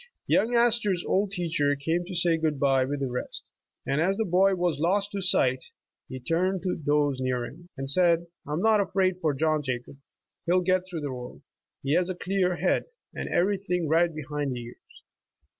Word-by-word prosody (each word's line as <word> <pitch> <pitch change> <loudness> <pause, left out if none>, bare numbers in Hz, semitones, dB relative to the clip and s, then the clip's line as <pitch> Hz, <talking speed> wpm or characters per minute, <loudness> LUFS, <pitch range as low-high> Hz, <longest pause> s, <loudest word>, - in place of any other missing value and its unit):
Young 240 +2 +2
Astor's 225 -6 +2
old 200 +1 +1
teacher 165 -6 0
came 165 +5 -1
to 185 0 -7
say 170 -1 +3
good 160 -3 -1
bye 135 -2 +3
witli 140 +1 -3
the 135 - 0
rest, 125 - -6 0.3
and 140 +3 0
as 190 +4 +1
the 220 - 0
boy 190 +2 +3
was 175 -5 0
lost 195 +5 +1
to 200 -2 -3
sight, 130 -8 +2 0.5
he 130 - -6
turned 180 +7 0
to 185 -2 0
those 145 -2 +1
near 125 -2 -1
him, 175 +7 -12
and 135 0 -4
said: 170 +3 +3
' - - -63
' - - -25
I 150 - -3
am 160 - -1
not 220 -2 +5
afraid 185 -2 0
for 155 -3 +1
Johu 155 0 +1
Jacob; 130 +1 -4 0.5
he'll 180 +2 +4
get 185 +1 +1
through 170 -3 -4
the 145 -3 -3
world. 125 -1 -9 0.4
He 140 +1 0
has 180 +2 +2
a 185 - -2
clear 180 0 0
head, 175 +3 +1 0.3
and - - -5
everything 180 -2 0
right 165 +2 +3
behind 150 -3 -3
the 120 - -5
ears." 120 +1 -15
170 Hz, 205 wpm, -27 LUFS, 145-185 Hz, 0.5 s, not